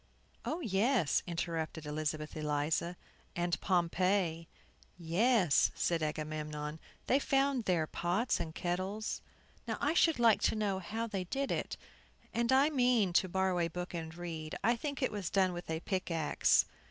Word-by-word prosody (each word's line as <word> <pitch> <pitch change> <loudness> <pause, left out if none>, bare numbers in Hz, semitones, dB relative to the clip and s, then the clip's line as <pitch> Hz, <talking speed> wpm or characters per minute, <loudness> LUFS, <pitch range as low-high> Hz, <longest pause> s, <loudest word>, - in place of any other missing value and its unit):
"Oh, 330 +3 -2
yes," 215 - +2
interrupted 165 -2 -3
Elizabeth 150 0 -3
Eliza, 155 +3 -1 0.4
"and 175 0 -1
Pompeii." 175 -1 +1 0.5
"Yes," 180 - +3
said 170 -2 0
Agamemnon, 150 0 -3 0.3
"they 265 - +3
found 275 -3 +1
there 170 -4 +2
pots 175 +10 0
and 160 -2 -5
kettles. 185 +5 -2 0.5
Now, - - -2
I 290 +2 +1
should 330 -2 +4
like 230 -3 +4
to - - +2
know 205 -3 0
how 220 +5 -3
they 195 -5 -3
did 275 +8 -2
it; - - -2 0.6
and 235 +2 +1
I 275 +4 +5
mean 245 - +3
to 185 +1 +3
borrow 190 0 +1
a 170 - +2
book 180 +2 -6
and 160 -1 -5
read. 165 -3 -5
I 235 +3 +4
think 285 +3 -4
it - - +1
was 200 -5 -3
done 190 -2 +2
with 175 -1 -7
a 160 0 -2
pickaxe." 165 - +2
180 Hz, 155 wpm, -33 LUFS, 160-225 Hz, 0.6 s, I